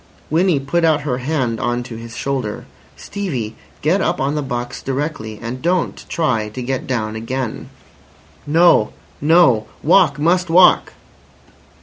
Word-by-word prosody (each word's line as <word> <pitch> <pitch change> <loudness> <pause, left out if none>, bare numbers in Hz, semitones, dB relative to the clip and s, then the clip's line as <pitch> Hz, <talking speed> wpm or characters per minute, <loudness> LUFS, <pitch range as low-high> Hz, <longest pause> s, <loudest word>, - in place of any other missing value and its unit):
Winnie 170 -1 +3
put 145 +6 -1
out 155 -2 +3
her 130 -4 -2
hand 130 -4 -1
on 120 -1 -1
to 120 -2 -9
his 115 0 -9
shoulder. 130 -6 -3 0.3
"Stevie! 135 - -4 0.3
Get 175 +7 +2
up 175 -1 0
on 135 +2 0
the 150 - -1
box 120 -3 -4
directly, 135 -6 -4
and 120 +3 -6
don't 175 +1 -1
try 120 -10 0
to 125 +4 -7
get 130 +1 -3
down 110 -4 -2
again." 115 +1 -4 0.8
"No. 160 -7 +4 0.3
No. 145 -9 +4 0.2
Walk. 160 -3 +4
Must 175 +4 +1
walk." 180 +2 +5
135 Hz, 140 wpm, -19 LUFS, 120-165 Hz, 0.8 s, walk